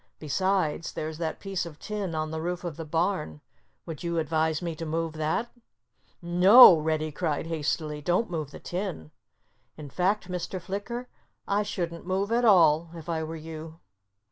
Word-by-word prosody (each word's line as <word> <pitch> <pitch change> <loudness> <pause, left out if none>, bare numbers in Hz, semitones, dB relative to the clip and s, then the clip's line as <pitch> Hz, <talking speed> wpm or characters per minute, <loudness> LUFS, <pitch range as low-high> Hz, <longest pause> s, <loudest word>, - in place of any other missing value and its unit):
"Besides, 170 0 -1
there's 155 0 -5
that 160 -2 -3
piece 195 -2 -3
of 165 -3 -9
tin 205 -4 -4
on 155 0 -2
the 160 0 -3
roof 175 +2 -3
of 170 -4 -4
the 165 - -6
barn. 160 - -1 0.5
Would 160 -3 -7
you 170 -1 -2
advise 160 0 +1
me 170 -2 -4
to 165 - -5
move 165 0 -2
that?" 160 +10 -1 0.7
"No!" 180 +5 +9
Reddy 155 0 -1
cried 155 -1 -2
hastily. 155 -1 -2
"Don't 180 +7 0
move 155 -4 -3
the - - -11
tin! 175 - -5 0.7
In 145 -3 -9
fact, 190 +4 0
Mr. 180 +1 -4
Flicker, 205 +8 -5 0.4
I 200 +1 +2
shouldn't 175 -4 -4
move 195 +3 -1
at 240 +1 +2
all, 165 -5 +5
if 165 0 -9
I 165 -1 -1
were 160 +1 -5
you." 160 0 -9
165 Hz, 170 wpm, -27 LUFS, 155-185 Hz, 0.7 s, No